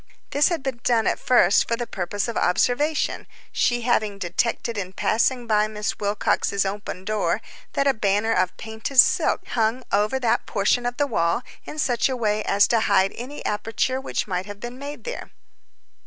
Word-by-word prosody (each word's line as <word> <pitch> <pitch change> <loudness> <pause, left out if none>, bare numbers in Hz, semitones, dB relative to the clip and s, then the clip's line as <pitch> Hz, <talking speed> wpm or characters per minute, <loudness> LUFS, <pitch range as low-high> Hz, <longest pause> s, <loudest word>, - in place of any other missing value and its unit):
This 285 +1 +4
had 335 -6 -2
been 265 -4 -3
done 230 -2 +2
at - - +1
first 240 -7 +4
for 230 - +1
the 240 +1 -4
purpose 200 +1 -3
of 235 - -4
observation, 290 - +1 0.2
she 240 -1 +1
having 215 -4 0
detected 200 +6 -1
in 190 -3 -4
passing 240 +5 +1
by 215 -2 +2
Miss 210 0 -4
Wilcox's 200 -1 0
open 195 -1 -5
door 215 +1 0 0.3
that 275 - +1
a 275 - +4
banner 210 0 +1
of 185 -2 0
painted 220 +4 -6
silk - - +4
hung 230 +2 0
over 210 +6 +1
that 240 -3 0
portion 225 +4 +1
of 245 - -4
the 290 - +2
wall 200 -3 0 0.2
in 305 - -8
such 245 -4 +1
a 260 - -2
way 215 -2 0
as 200 +1 +4
to 230 - +3
hide 195 -2 +2
any 260 +5 -8
aperture 225 +5 -1
which - - -2
might 200 +1 -4
be 240 - -5
made 280 +4 -8
there. - - -6
225 Hz, 180 wpm, -23 LUFS, 205-250 Hz, 0.3 s, This